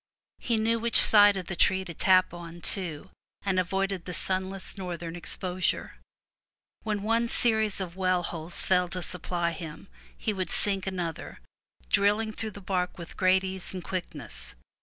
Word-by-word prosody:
He 235 Hz, -2 st, 0 dB
knew 225 Hz, +1 st, +2 dB
which 235 Hz, 0 st, +4 dB
side 205 Hz, -2 st, +7 dB
of 185 Hz, -, -4 dB
the 175 Hz, -, -4 dB
tree 190 Hz, +2 st, +3 dB
to 170 Hz, -, -6 dB
tap, 185 Hz, +2 st, +4 dB, 0.3 s
too, 180 Hz, -3 st, -1 dB, 0.3 s
and 190 Hz, -2 st, +1 dB
avoided 190 Hz, 0 st, -1 dB
the 180 Hz, -, -4 dB
sunless 190 Hz, 0 st, -1 dB
northern 175 Hz, -3 st, -5 dB
exposure. 180 Hz, +1 st, -1 dB, 0.8 s
When 210 Hz, -2 st, -2 dB
one 230 Hz, +2 st, +2 dB
series 220 Hz, -4 st, +2 dB
of 180 Hz, -2 st, -5 dB
well 185 Hz, -1 st, +1 dB
holes 165 Hz, 0 st, -3 dB
failed 180 Hz, -1 st, +2 dB
to 180 Hz, -1 st, -2 dB
supply 175 Hz, -1 st, -1 dB
him, 160 Hz, -, -8 dB, 0.3 s
he 215 Hz, -, -1 dB
would 185 Hz, -3 st, -3 dB
sink 195 Hz, -2 st, -1 dB
another, 175 Hz, -4 st, -4 dB, 0.5 s
drilling 210 Hz, +2 st, +2 dB
through 220 Hz, 0 st, -3 dB
the 205 Hz, -1 st, -11 dB
bark 180 Hz, -1 st, -1 dB
with 170 Hz, -2 st, -9 dB
great 190 Hz, 0 st, +4 dB
ease 190 Hz, 0 st, -4 dB
and 180 Hz, -, -5 dB
quickness. 165 Hz, -, -6 dB
185 Hz, 160 wpm, -28 LUFS, 180-200 Hz, 0.8 s, side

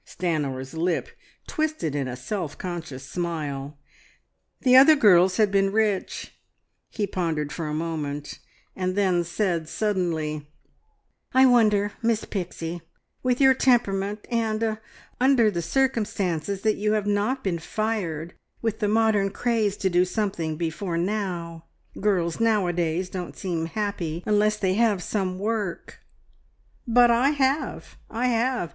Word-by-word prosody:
Stanor's 140 Hz, -7 st, -3 dB
lip 165 Hz, +1 st, -1 dB, 0.4 s
twisted 310 Hz, -, -2 dB
in 140 Hz, -2 st, -1 dB
a 125 Hz, -, -4 dB
self 145 Hz, +5 st, -4 dB
conscious 160 Hz, -7 st, -6 dB
smile. 150 Hz, -5 st, -4 dB, 0.8 s
The 255 Hz, -1 st, +5 dB
other 280 Hz, +4 st, +9 dB
girls 185 Hz, -7 st, +5 dB
had 210 Hz, -2 st, +3 dB
been 195 Hz, 0 st, +2 dB
rich. 210 Hz, -2 st, -1 dB, 0.5 s
He 210 Hz, -, -2 dB
pondered 160 Hz, -6 st, -2 dB
for 165 Hz, -3 st, -4 dB
a 150 Hz, -, -3 dB
moment, 150 Hz, -3 st, -4 dB, 0.4 s
and 185 Hz, -1 st, -2 dB
then 185 Hz, -4 st, +2 dB
said 170 Hz, -2 st, -1 dB
suddenly 160 Hz, -8 st, -2 dB, 0.9 s
"I 260 Hz, 0 st, +7 dB
wonder, 210 Hz, -5 st, +4 dB
Miss 225 Hz, -2 st, +1 dB
Pixie, 175 Hz, -3 st, -5 dB, 0.4 s
with 250 Hz, -1 st, +1 dB
your 265 Hz, -1 st, +6 dB
temperament, 210 Hz, -6 st, +1 dB
and 225 Hz, -1 st, 0 dB
er 220 Hz, -1 st, -1 dB, 0.4 s
under 250 Hz, -4 st, +4 dB
the 170 Hz, -3 st, -2 dB
circumstances 200 Hz, -, -1 dB
that 215 Hz, -1 st, +1 dB
you 210 Hz, +1 st, +1 dB
have 210 Hz, -2 st, 0 dB
not 205 Hz, +6 st, 0 dB
been 175 Hz, -4 st, -1 dB
fired 175 Hz, -5 st, -3 dB, 0.3 s
with 225 Hz, -1 st, -2 dB
the 210 Hz, -, +1 dB
modern 215 Hz, -2 st, +2 dB
craze 215 Hz, -1 st, 0 dB
to 195 Hz, -, 0 dB
do 180 Hz, -1 st, +3 dB
something 180 Hz, -5 st, -2 dB
before 170 Hz, +2 st, -3 dB
now. 175 Hz, -3 st, -3 dB, 0.3 s
Girls 180 Hz, -4 st, 0 dB
nowadays 180 Hz, -6 st, +1 dB
don't 180 Hz, -1 st, -6 dB
seem 170 Hz, -4 st, -2 dB
happy 180 Hz, -4 st, -3 dB
unless 210 Hz, 0 st, +2 dB
they 190 Hz, -3 st, +1 dB
have 210 Hz, -3 st, +2 dB
some 185 Hz, -2 st, -2 dB
work 205 Hz, -2 st, -3 dB, 0.4 s
" -, -, -38 dB
"But 240 Hz, +1 st, +5 dB
I 240 Hz, +4 st, +4 dB
have, 280 Hz, 0 st, -1 dB
I 245 Hz, +3 st, 0 dB
have! 240 Hz, -5 st, 0 dB
195 Hz, 140 wpm, -25 LUFS, 170-220 Hz, 0.9 s, other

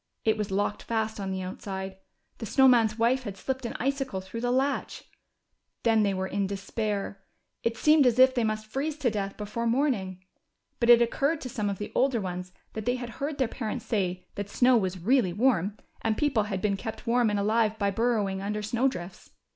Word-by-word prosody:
It 220 Hz, -1 st, +4 dB
was 210 Hz, -2 st, -3 dB
locked 205 Hz, +1 st, -1 dB
fast 220 Hz, -1 st, -2 dB
on 195 Hz, -1 st, -3 dB
the 190 Hz, 0 st, -3 dB
outside. 190 Hz, +1 st, -6 dB, 0.4 s
The 225 Hz, -, -5 dB
Snow 265 Hz, +6 st, +5 dB
Man's 230 Hz, -4 st, +4 dB
wife 240 Hz, +3 st, +2 dB
had 205 Hz, -5 st, -7 dB
slipped 260 Hz, +3 st, -3 dB
an -, -, -7 dB
icicle 270 Hz, -5 st, -1 dB
through 190 Hz, +5 st, -7 dB
the 245 Hz, -, 0 dB
latch. 265 Hz, +3 st, 0 dB, 0.8 s
Then 225 Hz, -2 st, +4 dB
they 200 Hz, -2 st, +1 dB
were 190 Hz, 0 st, -1 dB
in 195 Hz, +1 st, -1 dB
despair. 200 Hz, 0 st, -3 dB, 0.4 s
It 230 Hz, 0 st, -1 dB
seemed 300 Hz, -1 st, +5 dB
as 240 Hz, -1 st, +2 dB
if 260 Hz, 0 st, +7 dB
they 245 Hz, -2 st, +1 dB
must 215 Hz, 0 st, -1 dB
freeze 280 Hz, +7 st, -3 dB
to 265 Hz, -6 st, +1 dB
death 200 Hz, -2 st, -3 dB
before 215 Hz, +3 st, -3 dB
morning. 220 Hz, -8 st, 0 dB, 0.5 s
But 235 Hz, -, +1 dB
it 240 Hz, 0 st, +8 dB
occurred 280 Hz, +6 st, 0 dB
to 255 Hz, -, -5 dB
some 215 Hz, -5 st, -2 dB
of 200 Hz, -, -3 dB
the 205 Hz, -, -6 dB
older 260 Hz, -2 st, +2 dB
ones 180 Hz, -2 st, -5 dB, 0.2 s
that 220 Hz, +1 st, -6 dB
they 245 Hz, -, +2 dB
had 245 Hz, -1 st, -5 dB
heard 285 Hz, +1 st, -2 dB
their 260 Hz, -, +2 dB
parents 225 Hz, 0 st, -4 dB
say 185 Hz, -4 st, -1 dB
that 205 Hz, 0 st, -5 dB
snow 250 Hz, +4 st, +4 dB
was 190 Hz, -4 st, 0 dB
really 200 Hz, 0 st, +2 dB
warm, 210 Hz, -3 st, +1 dB, 0.2 s
and 220 Hz, -1 st, 0 dB
people 265 Hz, -8 st, +2 dB
had 195 Hz, -3 st, -4 dB
been 200 Hz, -2 st, +1 dB
kept 220 Hz, +4 st, -6 dB
warm 240 Hz, -1 st, +3 dB
and 205 Hz, -, 0 dB
alive 215 Hz, +1 st, +2 dB
by 200 Hz, -2 st, +1 dB
burrowing 205 Hz, -3 st, 0 dB
under 210 Hz, +1 st, -3 dB
snow 235 Hz, +5 st, +1 dB
drifts. 180 Hz, -8 st, -6 dB
220 Hz, 210 wpm, -28 LUFS, 200-245 Hz, 0.8 s, it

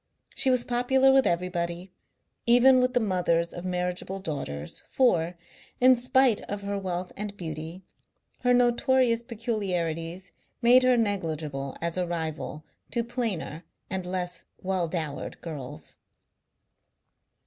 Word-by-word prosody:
She 265 Hz, -, +3 dB
was 250 Hz, -2 st, +3 dB
popular 260 Hz, +2 st, +3 dB
with 270 Hz, 0 st, +5 dB
everybody, 175 Hz, +1 st, -2 dB, 0.6 s
even 250 Hz, +2 st, +7 dB
with 250 Hz, 0 st, +1 dB
the -, -, +5 dB
mothers 175 Hz, -5 st, +1 dB
of 175 Hz, -, -7 dB
marriageable 180 Hz, +1 st, -2 dB
daughters, 80 Hz, -, -5 dB
for, 175 Hz, -9 st, +2 dB, 0.4 s
in 255 Hz, +1 st, +7 dB
spite 250 Hz, -1 st, +3 dB
of 205 Hz, 0 st, -4 dB
her 200 Hz, 0 st, -2 dB
wealth 185 Hz, -2 st, -3 dB
and 205 Hz, 0 st, -5 dB
beauty, 160 Hz, +1 st, -6 dB, 0.6 s
her 250 Hz, -, +2 dB
notorious 245 Hz, 0 st, +3 dB
peculiarities 185 Hz, -7 st, -3 dB, 0.3 s
made 245 Hz, +1 st, +6 dB
her 255 Hz, -1 st, +4 dB
negligible 155 Hz, -, -2 dB
as 170 Hz, +1 st, -2 dB
a 180 Hz, -1 st, 0 dB
rival 160 Hz, -2 st, -4 dB, 0.2 s
to 235 Hz, -, 0 dB
plainer 225 Hz, -, -3 dB, 0.3 s
and 185 Hz, -1 st, -2 dB
less 180 Hz, -1 st, -3 dB
well 185 Hz, -2 st, -1 dB
dowered 155 Hz, -4 st, -4 dB
girls. 150 Hz, -2 st, -8 dB
185 Hz, 125 wpm, -27 LUFS, 170-240 Hz, 0.6 s, even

